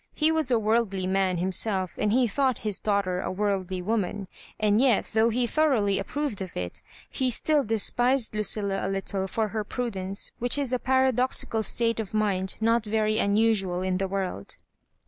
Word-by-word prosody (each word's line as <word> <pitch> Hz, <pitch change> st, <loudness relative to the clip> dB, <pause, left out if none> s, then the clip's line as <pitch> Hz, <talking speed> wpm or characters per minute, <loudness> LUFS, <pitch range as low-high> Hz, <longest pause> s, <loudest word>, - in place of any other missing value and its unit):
He 310 Hz, +1 st, +2 dB
was 315 Hz, -4 st, 0 dB
a 245 Hz, -, +3 dB
worldly 215 Hz, -3 st, 0 dB
man 190 Hz, -1 st, 0 dB
himself, 190 Hz, +1 st, 0 dB
and 210 Hz, -, 0 dB
he 250 Hz, +2 st, +3 dB
thought 260 Hz, +2 st, 0 dB
his 205 Hz, -2 st, +1 dB
daughter 200 Hz, -3 st, -1 dB
a -, -, -3 dB
worldly 190 Hz, -2 st, -2 dB
woman; 205 Hz, -1 st, -2 dB, 0.3 s
and 215 Hz, +1 st, +2 dB
yel, 255 Hz, -6 st, +3 dB
though 225 Hz, +1 st, +3 dB
he 240 Hz, +2 st, 0 dB
thoroughly 235 Hz, -8 st, +1 dB
approved 285 Hz, -9 st, -3 dB
of 185 Hz, -2 st, -7 dB
it, 90 Hz, -1 st, -4 dB, 0.3 s
he 260 Hz, -1 st, -1 dB
still 295 Hz, +4 st, +2 dB
despised 240 Hz, +3 st, +2 dB
Lucilla 205 Hz, -2 st, +1 dB
a -, -, -2 dB
little 195 Hz, 0 st, -2 dB
for 215 Hz, +2 st, -1 dB
her 215 Hz, +1 st, -3 dB
prudence, 200 Hz, -4 st, -2 dB
which 245 Hz, +3 st, +2 dB
is 275 Hz, -3 st, 0 dB
a 250 Hz, -, +1 dB
para 260 Hz, +1 st, +2 dB
doxical 235 Hz, -2 st, -1 dB
state 230 Hz, +2 st, +1 dB
of 215 Hz, -1 st, -5 dB
mind 195 Hz, -3 st, 0 dB
not 230 Hz, +1 st, +2 dB
very 215 Hz, 0 st, 0 dB
unusual 200 Hz, -3 st, +1 dB
in 185 Hz, -1 st, -1 dB
the 195 Hz, +1 st, -1 dB
world. 185 Hz, -, -4 dB
215 Hz, 180 wpm, -26 LUFS, 195-235 Hz, 0.3 s, a